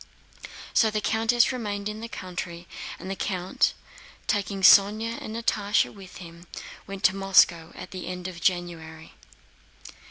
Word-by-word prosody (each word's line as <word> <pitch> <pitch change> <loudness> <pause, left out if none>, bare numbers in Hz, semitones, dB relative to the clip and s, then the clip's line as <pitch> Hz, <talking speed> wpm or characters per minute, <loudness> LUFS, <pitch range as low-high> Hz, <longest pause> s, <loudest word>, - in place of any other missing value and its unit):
So 220 - +4
the 215 0 -1
countess 225 +3 +2
remained 205 -5 -4
in 215 +1 -5
the 230 - -5
country, 175 -3 -7 0.3
and - - -9
the 195 - -3
count, 185 -2 0 0.5
taking 200 -2 -1
Sónya 215 +4 +5
and 220 - -6
Natásha 210 -2 +1
with 195 -2 -12
him, 170 -1 -12 0.4
went 195 0 -7
to 185 - +4
Moscow 185 -4 +4
at - - -9
the 185 -2 -7
end 180 0 -5
of 175 -2 -8
January. 165 -3 -2
195 Hz, 140 wpm, -26 LUFS, 175-215 Hz, 0.5 s, Sónya